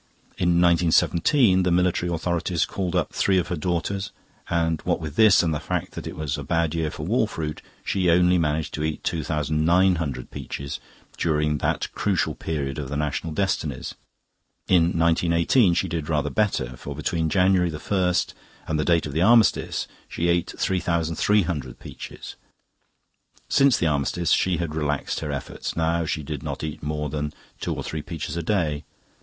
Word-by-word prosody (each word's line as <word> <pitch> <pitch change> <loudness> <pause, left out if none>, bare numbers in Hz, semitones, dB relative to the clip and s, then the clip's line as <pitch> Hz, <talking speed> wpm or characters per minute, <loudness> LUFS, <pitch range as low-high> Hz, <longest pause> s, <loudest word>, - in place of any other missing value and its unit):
In 85 -1 +3
1917 90 - +4
the 90 - +1
military 90 0 +1
authorities 85 0 0
called 90 -3 -3
up - - 0
three 95 -1 +2
of 90 -1 0
her 90 - -1
gardeners, 90 +4 -2 0.4
and 80 -2 0
what - - 0
with 75 -3 -6
this 110 -3 +6
and 80 -2 +1
the 75 - -1
fact - - -3
that - - -7
it - - -6
was 75 -2 -3
a - - -5
bad 85 +2 0
year 80 -2 -1
for 75 0 -6
wall 110 +4 +2
fruit, 75 -6 -5 0.2
she 90 -2 +1
only 90 +1 +4
managed 75 -1 -1
to 75 - -3
eat 80 -1 -3
2900 80 -1 +1
peaches 70 0 -6 0.4
during 75 -2 +1
that - - 0
crucial 95 -7 0
period 75 -2 -3
of 70 -3 -5
the 70 - -3
national 75 +2 -2
destinies. 75 -6 -2 0.7
In 85 -3 +5
1918 85 +5 +3
she - - +1
did 80 -2 -4
rather 75 -2 0
better, 65 - 0
for 70 +3 -7
between 80 +2 -1
January 90 0 +3
1st 90 +3 0 0.3
and 80 - -1
the - - +2
date 85 -1 +3
of 75 - -5
the 80 - 0
Armistice 115 +2 +3 0.2
she 85 +1 -1
ate 85 0 +1
3300 85 -4 0
peaches. - - -9 1.1
Since 140 -3 +4
the - - 0
Armistice 75 +3 0
she 90 -2 +3
had 85 -2 -3
relaxed 75 -2 -1
her 75 -2 -4
efforts; 70 - -5
now 80 +1 +1
she 75 0 -2
did 75 -1 -5
not - - -5
eat 75 -1 -5
more 75 0 -2
than 75 +1 -3 0.3
two - - -2
or - - -5
three 80 - -4
peaches 80 0 -5
a 85 - -1
day. 80 -5 0
80 Hz, 170 wpm, -24 LUFS, 75-90 Hz, 1.1 s, this